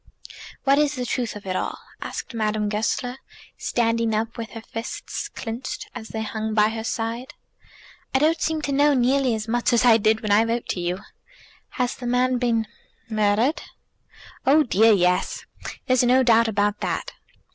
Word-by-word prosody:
"What 275 +1 +4
is 295 -1 +2
the 250 -1 -3
truth 240 -2 -2
of 205 - -9
it 185 -1 -2
all?" - - -2 0.3
said - - -6
Madame 215 -2 0
Goesler, 230 +4 -1 0.4
standing 230 -1 0
up 225 +2 -2
with 230 -1 -6
her 225 - -7
fists 225 0 -5
clenched 230 +2 -6
as 225 -3 -7
they 220 0 -4
hung 220 0 -3
by 210 0 +4
her 220 0 -4
side. 230 +5 -3 0.8
"I - - +3
don't 315 +4 +2
seem 315 -1 -1
to 285 - -1
know 285 +1 +4
nearly 255 -1 +2
as 215 0 -5
much 240 +2 +1
as 235 +1 +4
I 230 -2 +7
did 220 0 +2
when 215 - -2
I 210 +2 +6
wrote 230 +1 -2
to - - -1
you." 175 +2 -2 0.8
"Has 250 -2 0
the 245 - -7
man 250 +1 +2
been 230 -2 +1 0.5
murdered?" 215 +7 +2 0.8
"Oh 300 +4 +5
dear, 225 -2 +4
yes. 180 -3 +1 0.4
There's 255 -1 +3
no 255 +1 +4
doubt 230 -1 +5
about 205 -1 0
that. - - -3
230 Hz, 175 wpm, -23 LUFS, 220-255 Hz, 0.8 s, I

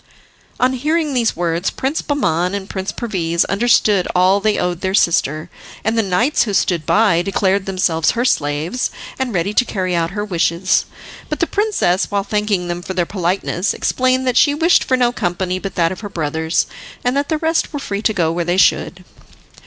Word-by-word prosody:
On 255 +1 +2
hearing 300 +3 0
these 240 -3 +1
words 170 +1 -1
Prince 275 +5 -2
Bahman 185 - 0
and 195 -1 -5
Prince 190 -1 -4
Perviz 170 -7 -1
understood 205 -3 +2
all 185 +2 +4
they 215 +1 +1
owed 175 -1 -2
their 190 0 0
sister, 155 -4 +1 0.4
and 220 +2 0
the 225 - +3
knights 220 +9 +1
who 210 -4 0
stood 170 -5 0
by 205 -6 +3
declared 195 +1 0
themselves 175 -4 +1
her 240 - +1
slaves 155 - 0 0.3
and 260 -2 -1
ready 195 +1 -1
to 245 - +4
carry 185 -6 -2
out 165 -1 0
her 205 +2 -4
wishes. 175 -1 +1 0.4
But - - -3
the - - +2
princess, 410 - 0
while 200 -1 0
thanking 205 -3 -1
them 175 0 -3
for 190 +1 -6
their 175 - +1
politeness, 180 +1 -1
explained 255 0 +1
that 250 -1 +1
she 290 -1 +4
wished 335 +3 +3
for 255 - +1
no 245 -1 +2
company 185 -3 -2
but 195 0 -6
that 165 -1 +2
of 185 - -6
her 205 - -7
brothers, 160 -1 -1 0.4
and 250 +1 +1
that 280 +1 -1
the 315 - +1
rest 320 +1 0
were 290 - -4
free 205 -8 -4
to 220 - +2
go 170 -6 0
where 170 +1 -1
they 175 +2 0
would. 185 0 -8
195 Hz, 195 wpm, -18 LUFS, 175-240 Hz, 0.4 s, all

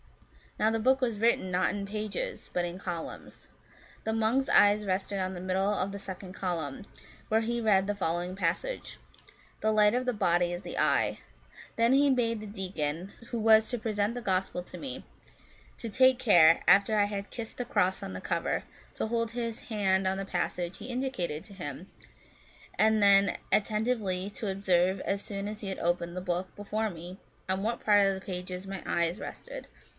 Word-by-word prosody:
Now 215 - +4
the 225 - 0
book 260 +4 +3
was 230 -5 0
written, 230 -4 +2
not 180 +1 +2
in 200 -1 -3
pages, 215 - -4
but 175 -1 0
in 175 +1 -5
columns. 175 -4 -7 0.6
The 220 - -1
monk's 225 +5 +1
eyes 205 +1 +5
rested 195 +1 -1
on 185 0 -2
the 180 - -6
middle 190 +2 0
of 200 -1 -1
the 200 - -6
second 190 -1 -7
column, 175 -3 -3 0.4
where 220 +1 +3
he 235 +1 -1
read 200 -4 +3
the 205 +1 -1
following 175 -1 -2
passage, 190 - -2 0.3
* - - -27
The 220 - +2
light 210 0 +5
of 250 +1 0
the 250 - +2
body 175 -4 +2
is 175 +2 -5
the - - -6
eye.* - - +2 0.6
Then 230 +2 +3
he 280 +1 +5
bade 230 -4 +1
the 215 - -7
deacon, 185 -3 -3 0.2
who 235 - -3
was 220 0 +5
to 245 - -2
present 215 -1 -1
the 245 - -4
Gospel 190 -3 -1
to - - -10
me, 275 - -6 0.7
to 230 - -5
take 260 +3 +5
care, 170 -9 +6
after 200 +2 +5
I 205 - +4
had 200 -1 -4
kissed 230 -2 -6
the 245 - -3
cross 190 -5 +1
on 95 - -5
the 90 - -6
cover, - - -1 0.3
to - - -2
hold 230 0 -1
his 230 -1 -4
hand 195 -4 +1
on 190 0 0
the 195 - -3
passage 175 -1 -2
he - - -8
indicated 245 - -3
to 210 - -13
him, 175 0 -7 0.9
and 220 0 +4
then 200 0 +5
atten 215 +1 +2
tively 200 -6 -1
to 210 - -4
observe, 190 -1 +2
as 195 0 -1
soon 200 -1 -5
as 215 +1 -6
he 200 - -4
had 190 - -4
opened 175 0 -1
the - - -2
book 180 0 -3
before 215 +2 -2
me, 175 +1 -9 0.3
on 190 +1 -1
what 230 +2 -2
part 205 -1 +6
of 195 0 +2
the 190 - -7
pages 180 0 -5
my 195 -1 -5
eyes 170 +3 0
rested. - - -8
200 Hz, 195 wpm, -29 LUFS, 185-220 Hz, 0.9 s, care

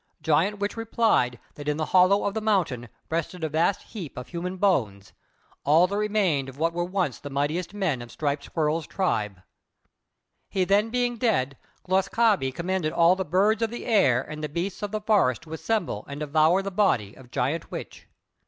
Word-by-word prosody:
Giant 170 +7 +2
Witch 205 0 -2
replied 225 - +1
that 145 0 -9
in 150 0 0
the 155 - -1
hollow 185 +2 +5
of 200 - 0
the 220 - -2
mountain 170 - 0 0.2
rested 165 +1 -2
a 160 - 0
vast 165 +6 +1
heap 180 -10 -8
of 125 - -7
human 180 +2 -4
bones, 110 - 0 0.5
all 160 +5 +5
that 195 +2 -3
remained 200 -10 +1
of 135 - -12
what 165 +2 0
were 175 0 -1
once 180 -6 -1
the 145 - -7
mightiest 145 +6 -1
men 175 -11 -1
of 120 - -10
Striped 145 -1 -2
Squirrel's 155 0 -1
tribe. 105 - -1 1.1
He 190 - +1
then 205 +4 +2
being 245 0 0
dead, 140 - +1 0.3
Glūs 190 +1 +2
kābé 210 - +2
commanded 170 +1 -2
all 170 +2 +5
the 190 - -2
birds 200 +6 +2
of 225 - +1
the 240 - -7
air 135 - +3
and 155 +1 -8
the 150 - -2
beasts 175 +6 -3
of 205 - -2
the 215 0 -2
forest 200 - +2
to 160 0 -10
assemble 170 - -2
and 140 +1 -7
devour 155 +5 +3
the 195 - -4
body 150 - +1
of 125 -1 -16
Giant 140 +7 -2
Witch. - - -8
170 Hz, 190 wpm, -26 LUFS, 145-200 Hz, 1.1 s, hollow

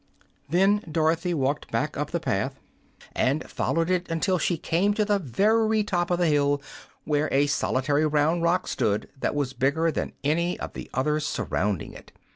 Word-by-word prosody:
Then 195 +6 +3
Dorothy 165 +3 +1
walked 140 0 -1
back - - -1
up - - -2
the - - -1
path, - - -2 0.6
and 140 +5 +1
followed 165 +2 -1
it 180 -1 0
until 175 +3 +1
she 170 +2 0
came 190 +6 +1
to 210 - +1
the 205 -1 +2
very 215 - +2
top 175 -4 -1
of 175 - +1
the 175 - +2
hill, 145 -2 +2 0.4
where 150 0 0
a 140 +1 +3
solitary 145 +1 +1
round 155 +3 +2
rock 175 +2 +1
stood 105 0 -1
that - - -1
was 140 -3 -1
bigger 145 +6 +1
than - - -3
any 170 +5 0
of - - -6
the - - -8
others 150 +3 0
surrounding 100 -2 -2
it. - - -13
160 Hz, 175 wpm, -26 LUFS, 145-180 Hz, 0.6 s, Then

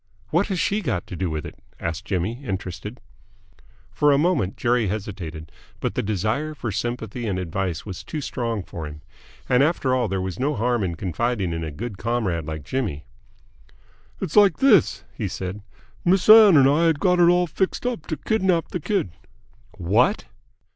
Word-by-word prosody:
"What 175 +5 +2
has 190 -4 -2
she 205 +5 +1
got 120 - -2
to - - -8
do 90 0 -2
with 80 -1 -4
it?" - - -10 0.2
asked 80 -1 -4
Jimmy, 105 +8 -2
interested. 100 +1 -5 0.9
For 150 0 +3
a 140 - +4
moment 150 - +1
Jerry 120 -2 +1
hesitated, 90 -6 -5 0.3
but - - -2
the - - -1
desire 110 - -1
for 120 -6 -4
sympathy 120 +1 -3
and 95 -3 -1
advice 90 -1 -3
was 95 -2 -7
too 150 +9 -5
strong 115 -6 -3
for 80 -4 -7
him. 75 0 -10 0.5
And 125 +1 +4
after 140 -3 +2
all 125 -2 +1
there 95 -1 -2
was 95 -1 -4
no 145 +3 0
harm 120 0 0
in 85 -3 -2
confiding 95 +2 -1
in 80 0 -3
a 80 - -3
good 100 +6 -6
comrade 105 -9 -1
like 80 -1 -5
Jimmy. 95 - -3 1.1
"It's - - -4
like 205 -4 +6
this," 225 - +4
he - - -3
said. 95 +2 -5 0.4
"Miss 185 +1 +2
Ann 215 -5 +9
and 135 - +6
me 140 +3 +4
had 160 -3 +2
got 180 +1 +3
it 170 -1 +6
all 180 0 +4
fixed 185 +7 -2
up 245 -11 -3
to 155 - -3
kidnap 190 -6 +1
the 180 - -3
kid!" 185 - -1 0.7
"What!" 115 - +2
120 Hz, 180 wpm, -23 LUFS, 95-155 Hz, 1.1 s, Ann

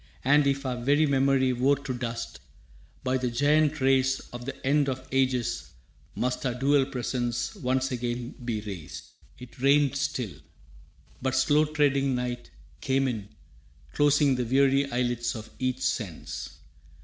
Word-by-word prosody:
And, 145 +2 +4
if 140 0 0
our 125 -2 -2
very 145 +4 +4
memory 135 -2 +2
wore 130 +3 +3
to 135 -1 -5
dust, 115 -2 -5 0.6
By 130 0 +1
the 125 -1 -1
giant 150 +4 +2
race 135 0 +3
of 120 0 -7
the 135 - -7
end 140 +1 +3
of 130 0 -5
ages 130 - 0 0.5
must 125 0 -1
Our 125 -2 -1
dual 135 +1 +3
presence 120 - -2
once 130 -7 -1
again 120 0 -3
be 115 -3 -2
raised.» 95 -7 -8 0.3
It 125 0 -13
rained 140 +1 +4
still. 135 - -2 0.9
But 130 0 0
slow 145 +3 +4
treading 140 -3 +1
night 125 -1 -4 0.3
came 135 0 +1
in 110 -5 -4 0.6
Closing 145 -1 +4
the 125 -1 0
weary 135 +3 +2
eyelids 120 -1 -1
of 110 -1 -8
each 130 0 -1
sense. 110 -10 -3
130 Hz, 145 wpm, -27 LUFS, 120-140 Hz, 0.9 s, And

